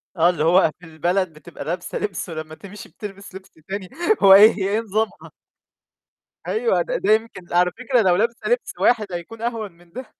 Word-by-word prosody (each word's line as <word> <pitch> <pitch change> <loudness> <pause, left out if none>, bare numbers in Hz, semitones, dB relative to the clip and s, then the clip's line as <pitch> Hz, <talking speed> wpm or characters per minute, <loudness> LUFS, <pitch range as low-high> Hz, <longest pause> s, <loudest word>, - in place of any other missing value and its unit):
آه، 170 +1 +4
اللي 160 -4 -1
هو 170 0 +4
في 180 - -14
البلد 175 +3 -1
بتبقى 155 -2 -10
لابسة 175 +2 -4
لِبس، 185 -3 -4
ولمّا 155 -1 -7
تمشي 200 +4 -12
بتلبِس 195 -2 -10
لبس 190 0 -11 0.2
تاني، 195 -2 -5 0.3
هو 195 - +9
إيه 210 +3 +9
هي 195 -2 -3
إيه 210 +2 +1
نظامها؟ 220 0 -3 1.1
أيوه، 465 +2 0
ده - - -2
ده 215 - +3
يمكن 220 -5 -2
على 180 0 +3
فكرة 250 -1 0
لو 180 -3 +3
لابسة 230 - -1
لبس 485 0 0
واحد 215 -5 +2
حيكون 175 +6 -7
أهون 230 -4 -3
من 170 0 -23
ده. 255 +5 -9
195 Hz, 190 wpm, -21 LUFS, 175-220 Hz, 1.1 s, هو